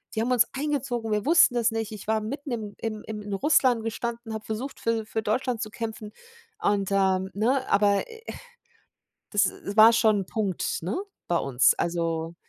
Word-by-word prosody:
„Die 220 - 0
haben 245 +2 -1
uns 240 -1 +4
eingezogen, 270 -6 -2
wir 210 -1 0
wussten 335 -3 +6
das 235 -1 +3
nicht. 225 -1 -3
Ich 210 -1 -9
war 220 0 +1
mitten 280 +5 -5
im 215 -4 -4
im 215 -2 -4
in 210 -2 -6
Russland 255 -1 +3
gestanden, 230 0 -4
habe 220 -1 -6
versucht, 240 +6 -5
für 230 -1 -1
für 220 0 -3
Deutschland 240 +2 -1
zu 215 - -3
kämpfen“, 220 -1 -6 0.5
und, 200 - +1
ähm, 190 -1 +2
ne? 255 +6 +1
Aber, 200 -1 +3
äh, 455 0 -12 1.1
das 205 -1 +3 0.2
das 200 +2 -5
war 225 +2 +9
schon 215 -3 +3
'n - - -7
Punkt, 200 -3 -2
ne? 180 +5 -2 0.3
Bei 170 - +3
uns, 135 -2 +3
also 165 -1 -2
220 Hz, 185 wpm, -26 LUFS, 200-235 Hz, 1.1 s, war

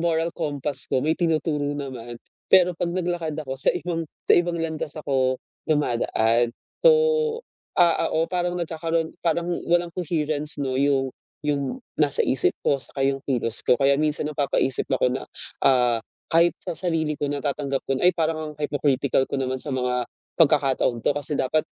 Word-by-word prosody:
moral 165 0 +1
compass 140 -3 -3
ko 130 - +1
may 155 - +3
tinuturo 160 -3 0
naman. 125 -4 -6 0.4
Pero 180 -2 +6
'pag 170 0 -1
naglakad 175 -3 -2
ako 135 -2 -5
sa 135 - +2
ibang 165 -1 -3 0.2
sa - - +7
ibang 175 0 +2
landas 160 -2 -3
ako 130 -3 0 0.2
dumadaan. 120 -5 +1 0.3
So, - - +10 0.9
ah, 175 -3 +4
oo, 165 +1 +1
parang 175 -1 -1
nagkakaroon 165 0 -2
parang 170 +1 +1 0.2
walang 175 0 +2
coherence, 155 -4 -2
'no, 130 -2 -1
'yong 135 -1 +2 0.4
'yong 145 - -1 0.2
nasa 145 -2 +2
isip 130 - +2
ko 140 - +3
saka 135 - -6
'yong 135 0 +1
kilos 120 -4 -2
ko. - - +5
Kaya 140 0 +4
minsan 150 0 0
napapaisip 140 -3 0
ako 125 - +3
na, 130 - -3 0.4
ah, 125 -3 +4 0.3
kahit 170 +1 +5
sa - - -5
sarili 160 -3 -1
ko 145 - -2
natatanggap 140 -1 -2
ko 135 - +1
na, - - 0
"Ay, - - +4
parang 155 -2 -1
ang - - -17
hypocritical 140 -2 +1
ko - - -2
naman 130 0 -1
sa 150 - -4
mga 125 -1 0 0.4
pagkakataong 135 -5 +3
'to. - - +4
Kasi 145 +1 -2
dapat 155 +4 +1
150 Hz, 165 wpm, -24 LUFS, 135-165 Hz, 0.9 s, So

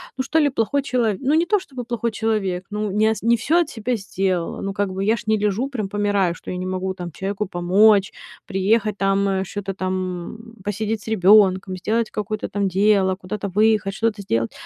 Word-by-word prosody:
ну 260 - -1
что 295 +4 -1
ли 295 -2 +4
плохой 270 +2 0
чело 250 -4 0
ну 275 +2 +1
не 330 +2 +3
то, 415 +3 +3
чтобы 265 -8 -8
плохой 235 0 -2
человек, 210 -5 -1
ну 210 -1 -2
не 210 +2 +2
ас 220 -2 -1
не 235 +1 +4
всё 310 +10 +2
от 325 - -2
себя 240 +2 -2
сделала. 190 -4 -2
Ну 195 - -3
как 200 -1 -1
бы 190 +1 -3
я 220 +3 +2
ж - - -8
не 215 0 +2
лежу, 210 +6 0
прям 220 -8 -4
помираю, 205 -3 +1
что - - -8
я 180 - -4
не 185 0 -4
могу 185 0 -2
там 175 -2 -7
чеку 195 +5 -3
помочь, 195 +3 +4 0.3
приехать 210 +2 +1
там, 195 0 +2
э, 190 -1 0
чё-то 195 +1 -5
там, 185 0 -2 0.4
м, 225 +1 -14
посидеть 210 +2 -2
с - - -15
ребёнком, 190 -2 +4
сделать 220 +4 -1
какое-то 215 0 -3
там 200 -1 -1
дело, 195 0 +3
куда-то 195 +2 -5
выехать, 210 0 +2
что-то 220 -2 -1
сделать. 115 -12 -1
205 Hz, 215 wpm, -22 LUFS, 190-225 Hz, 0.4 s, ли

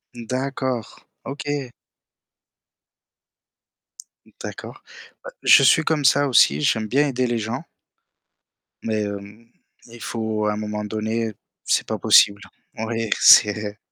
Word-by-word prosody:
D'accord, 130 0 -5 0.2
OK. 140 -2 -5 2.5
Mmh, - - -23
d'accord. - - -9 0.4
Heu, - - -6
je - - +6
suis 165 - +4
comme 155 -3 -1
ça 145 +2 +3
aussi, 75 - +3
j'aime 110 +7 0
bien 145 +5 +1
aider 130 -1 -1
les 120 -1 -2
gens 115 +7 -5 1.2
mais 110 -2 -2
hem, 100 +3 -8 0.4
il 115 0 -14
faut 110 -2 -3
à 105 - 0
un - - -5
moment 105 0 -5
donné 110 +1 -3 0.3
c'est - - 0
pas - - -3
possible. 100 0 +4 0.4
Oui, 115 0 -3
c'est 105 0 +5
115 Hz, 120 wpm, -21 LUFS, 105-130 Hz, 2.5 s, je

